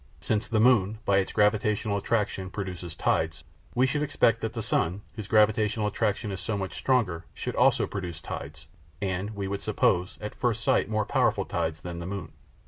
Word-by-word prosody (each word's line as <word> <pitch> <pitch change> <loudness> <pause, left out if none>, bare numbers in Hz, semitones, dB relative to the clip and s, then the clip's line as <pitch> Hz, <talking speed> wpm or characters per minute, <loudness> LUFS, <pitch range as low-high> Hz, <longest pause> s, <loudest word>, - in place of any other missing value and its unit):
Since 110 0 0
the 110 -2 +1
moon, 110 -3 +4
by 100 -1 +4
its 95 - -1
gravitational 105 0 +2
attraction, 100 -3 -1
produces 90 -4 -5
tides, - - 0 0.3
we 125 +2 +4
should 145 +3 0
expect 115 -6 +2
that 110 0 -2
the 115 -2 -3
sun, 100 -2 0
whose 110 -4 -7
gravitational 105 0 +3
attraction 105 0 -1
is 95 - -4
so 110 -3 -2
much 95 -1 -4
stronger, 95 -11 +1
should - - -4
also - - +4
produce 90 -5 -5
tides 80 +1 -7 0.3
and, 100 +2 -2
we 100 -1 -3
would 100 +1 -3
suppose 90 +1 +1
at - - -5
first - - -1
sight, - - +2
more 110 -1 0
powerful - - +2
tides 80 0 -2
than 85 -1 -6
the 85 - -5
moon. 100 -1 -5
100 Hz, 185 wpm, -27 LUFS, 95-110 Hz, 0.3 s, moon